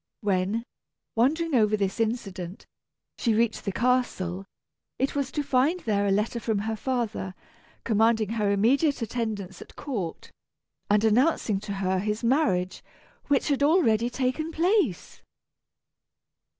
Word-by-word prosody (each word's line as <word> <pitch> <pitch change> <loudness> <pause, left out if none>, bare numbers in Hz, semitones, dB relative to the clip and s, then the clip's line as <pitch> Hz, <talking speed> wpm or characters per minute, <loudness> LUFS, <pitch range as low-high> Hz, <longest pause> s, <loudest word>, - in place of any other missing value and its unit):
When, 200 +2 0 0.5
wondering 305 +8 +1
over 215 -3 +3
this 195 +1 -2
incident, 195 -6 -3 0.5
she 230 -3 +2
reached 230 0 0
the 200 - 0
castle, 195 -6 0 0.5
it 270 - 0
was 280 -2 -2
to 295 - -2
find 280 +7 +2
there 205 -2 0
a - - +2
letter 210 +4 0
from 220 -2 -1
her 220 +2 -2
father, 225 -6 -3 0.5
commanding 220 -1 +2
her 215 -2 0
immediate 255 +7 +2
attendance 210 -5 -4
at - - -13
court, 205 - -5 0.6
and 210 +1 +3
announcing 225 -2 +2
to 205 0 -6
her 190 -1 0
his 210 +3 -2
marriage, 210 - +1 0.4
which 285 0 +2
had 280 -1 +1
already 265 - +3
taken 265 +6 -2
place. 335 - 0
225 Hz, 130 wpm, -26 LUFS, 200-260 Hz, 0.6 s, over